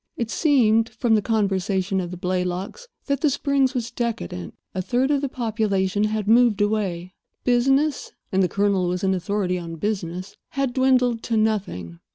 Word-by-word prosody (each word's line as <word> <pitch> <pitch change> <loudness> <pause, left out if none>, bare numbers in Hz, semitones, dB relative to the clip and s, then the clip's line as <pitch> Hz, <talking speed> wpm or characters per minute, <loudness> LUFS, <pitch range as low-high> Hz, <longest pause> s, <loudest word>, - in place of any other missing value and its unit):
It 230 -1 -2
seemed 230 -7 +3
(from 240 -3 0
the 215 - +4
conversation 195 -3 0
of 175 - -5
the 180 - -7
Blaylocks) 180 - -3 0.2
that 280 -1 -1
the 305 - +4
Springs 275 -1 +1
was 235 -2 -2
decadent. 150 - -4 0.2
A 185 - -2
third 255 +7 +1
of 285 -2 +2
the 280 - -2
population 210 -5 0
had 215 -1 -2
moved 230 -1 +5
away. 195 -4 -1 0.3
Business—and 260 -5 +1
the 180 - +2
Colonel 200 -2 +1
was 180 +1 -2
an 190 0 +2
authority 185 0 -1
on 165 -1 -7
business—had 195 - -3
dwindled 250 -3 +2
to 225 -1 -1
nothing. 190 - -1
215 Hz, 160 wpm, -23 LUFS, 185-245 Hz, 0.3 s, moved